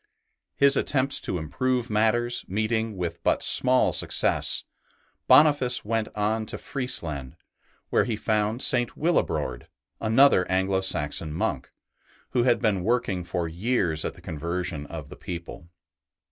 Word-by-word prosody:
His 140 0 +5
attempts 135 0 +2
to 90 - -3
improve 120 - -2
matters 120 +3 +1
meeting 110 +1 -2
with 85 -2 -4
but - - +1
small 130 0 +4
success, - - +1 0.6
Boniface 130 -3 +4
went 110 0 -1
on 110 +1 -1
to - - -5
Friesland, 80 - -2 0.6
where - - +3
he 115 -2 -2
found 110 +3 -1
St. 120 -1 +1
Willibrord, 145 - -1 0.3
another 110 -4 +4
Anglo 95 +1 +1
Saxon 75 -3 -2
monk, 75 - -3 0.6
who 125 - +1
had 120 0 +2
been 105 -6 0
working 100 -5 0
for 85 0 -3
years 85 -3 -1
at - - -4
the - - -16
conversion 85 -1 -4
of - - -8
the - - -10
people. 85 0 -8
105 Hz, 130 wpm, -25 LUFS, 90-120 Hz, 0.6 s, His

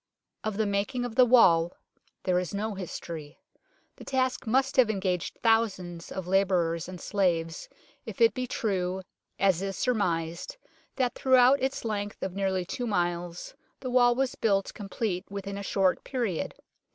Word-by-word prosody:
Of 215 -2 -2
the 220 - +2
making 200 +5 -1
of 245 - -5
the 250 +1 +5
wall 175 -9 +5 0.5
there 180 -1 +2
is 180 +2 -4
no 215 +2 -2
history. 165 -5 -7 0.6
The - - -11
task 260 -2 -1
must 265 +4 +2
have 250 -4 +6
engaged 190 -4 -1
thousands 190 -7 +1
of 190 -2 -4
labourers 180 -3 +1
and 185 -1 -8
slaves 170 -5 -1 0.3
if - - -8
it 460 -1 +5
be 255 -1 -3
true, 190 -5 -1 0.3
as 190 -3 +3
is 195 -1 -3
surmised, 180 - -1 0.4
that 255 -3 +1
throughout 260 +1 +5
its 265 -2 -2
length 205 -2 -3
of 190 - -3
nearly 190 -2 -1
two 245 +6 -4
miles 175 -3 -2 0.3
the 255 -2 -5
wall 245 -1 +5
was 265 0 0
built 195 -3 0
complete 195 -2 -3
within 200 0 -5
a 200 - -5
short 195 -1 +1
period. 235 - -2
200 Hz, 155 wpm, -28 LUFS, 180-240 Hz, 0.6 s, have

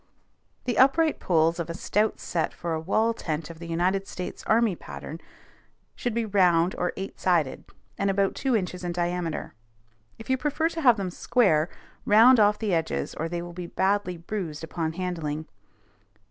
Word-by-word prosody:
The 245 -4 -1
upright 305 +4 +4
poles 165 -1 +2
of 170 - -3
a 165 - -4
stout 210 +4 0
set 165 -2 -2
for 170 -2 -3
a 160 - -1
wall 220 +7 +1
tent 160 -5 -4
of 165 - -13
the 170 - -8
United 185 +4 0
States 180 - -6
Army 220 -3 +3
pattern 160 0 -8 0.8
should 240 -3 -3
be 235 -1 0
round 180 -4 +3
or 180 - 0
eight 195 +1 -6
sided, 170 -7 +1 0.3
and 200 - +1
about 195 0 +1
two 265 -3 0
inches 180 -3 -2
in 175 -1 -2
diameter. 175 -4 -2 0.6
If 225 - -11
you 260 - +2
prefer 300 +4 0
to 330 -1 -5
have 245 -6 +6
them 190 -2 -3
square, 175 -6 +2 0.3
round 230 +4 +7
off 210 0 +4
the 210 -4 -1
edges, 165 -1 -1
or 165 +1 -3
they 170 0 -3
will 175 0 -8
be 175 0 -6
badly 190 -1 0
bruised 170 -4 -5
upon 160 0 -3
handling. 160 -4 -3
180 Hz, 175 wpm, -26 LUFS, 165-215 Hz, 0.8 s, round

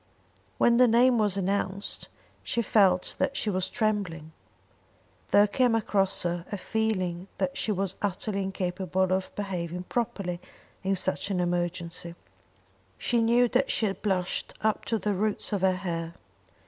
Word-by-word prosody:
When 235 -1 +4
the 250 0 +7
name 240 +1 +5
was 205 -2 +2
announced 195 0 -1 0.4
she 235 - -1
felt 190 -5 +3
that 275 0 0
she 210 - 0
was 185 0 -1
trembling. 200 -9 -1 1.0
There 205 - +6
came 240 +3 +2
across 195 -3 +1
her 175 -1 -1
a 205 - -2
feeling 185 -4 -1
that 185 -2 -1
she 220 - -1
was 195 -1 -1
utterly 200 +1 -1
incapable 185 -1 -1
of 190 0 -1
behaving 180 -3 -3
properly 185 -5 -2 0.4
in 195 +1 +1
such 190 +2 -1
an 190 -2 0
emergency. 175 -1 -2 0.8
She 235 -1 +1
knew 240 +2 +4
that 260 +3 +2
she 215 -3 +1
blushed 190 -2 -2
up 215 0 0
to 225 - 0
the 210 -1 -1
roots 210 +2 -1
of 200 - 0
her 190 -1 +3
hair. 170 -3 -4
195 Hz, 150 wpm, -28 LUFS, 180-215 Hz, 1.0 s, the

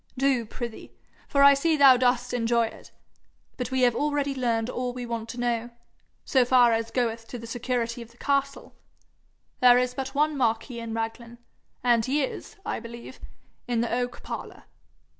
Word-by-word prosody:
'Do, 260 -4 +1
prithee, 235 0 -7 0.4
for 280 0 +3
I 280 0 +9
see 310 +3 +1
thou 275 -3 +8
dost 250 0 +1
enjoy 235 -1 +2
it. 220 - -10 0.7
But 250 -2 -4
we 260 0 0
have 245 -1 +4
already 290 0 0
learned 235 -4 0
all 250 0 -3
we 250 -1 -5
want 230 -1 -5
to 245 - -6
know, 240 -1 -1 0.6
so 260 -2 +3
far 245 -1 +5
as 225 0 -1
goeth 230 -2 -2
to 245 - -7
the 230 - -9
security 235 0 -2
of 230 - -10
the 235 - -22
castle. 280 +1 -1 0.9
There 245 -1 +7
is 250 0 +1
but 270 +1 -5
one 300 +1 +2
marquis 235 -1 -1
in 230 -1 -5
Raglan, 230 +1 -5 0.5
and 240 -2 +3
he 275 +5 +1
is, 270 - -6
I - - -2
believe, 235 +2 -10 0.5
in 240 -2 0
the 235 - -2
oak 245 0 -3
parlour.' - - -7
245 Hz, 180 wpm, -26 LUFS, 230-260 Hz, 0.9 s, I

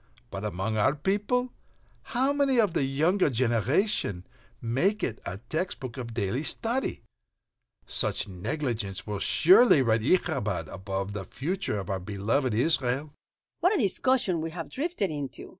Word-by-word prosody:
But 95 +3 -5
among 105 +2 -2
our 130 +7 +3
people, 210 - 0 0.6
how 265 +3 +3
many 275 -3 +2
of 205 -7 +3
the 140 - +1
younger 160 +7 +2
generation 120 - 0 0.3
make 175 - 0
it 110 - -2
a 90 - -4
text 180 +4 -2
book 125 -3 -6
of 120 -3 -6
daily 110 +4 -1
study? 230 - 0 0.8
Such - - 0
negligence 100 - -3
will 105 -2 -3
surely 185 - +6
write 115 -2 +2
its 175 +11 +3
'Ichabod' 90 -6 -2
upon 95 +1 -4
the 100 -2 -5
future 165 - -3
of 95 -1 -4
our 95 - -1
beloved 105 +6 -1
Israel." 135 +2 +1 0.5
"What 370 +5 +3
a - - +2
discussion 205 - +1
we 165 - -3
have 165 0 -7
drifted 285 - -2
into!" 140 -4 -6
135 Hz, 150 wpm, -28 LUFS, -, 0.8 s, surely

